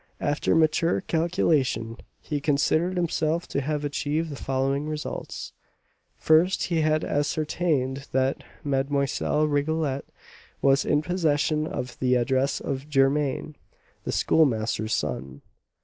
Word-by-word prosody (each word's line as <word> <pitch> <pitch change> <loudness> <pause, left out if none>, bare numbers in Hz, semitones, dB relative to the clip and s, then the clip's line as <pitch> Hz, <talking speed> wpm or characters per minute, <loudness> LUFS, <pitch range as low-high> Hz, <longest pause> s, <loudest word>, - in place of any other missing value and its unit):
After 145 +2 +1
mature 155 - +2
calculation, 155 - 0 0.2
he 145 -2 -4
considered 155 +5 +1
himself 165 -1 0
to 140 - -1
have 150 +1 -2
achieved 150 +2 -1
the - - -5
following 135 +2 -1
results: 155 0 -5 0.6
First, 165 +4 +3
he 170 -2 0
had 155 0 +2
ascertained 145 -2 -1
that 130 +1 0 0.2
Mlle. 140 +2 0
Rigolette 145 -1 0 0.5
was 135 +1 +3
in 150 0 +2
possession 155 -3 +1
of 125 -5 -5
the 125 -1 +2
address 130 +3 +1
of 135 +2 -4
Germain, 140 +1 +1 0.5
the - - -3
Schoolmaster's 110 -7 +2
son. 70 +1 -4
145 Hz, 115 wpm, -26 LUFS, 135-155 Hz, 0.6 s, First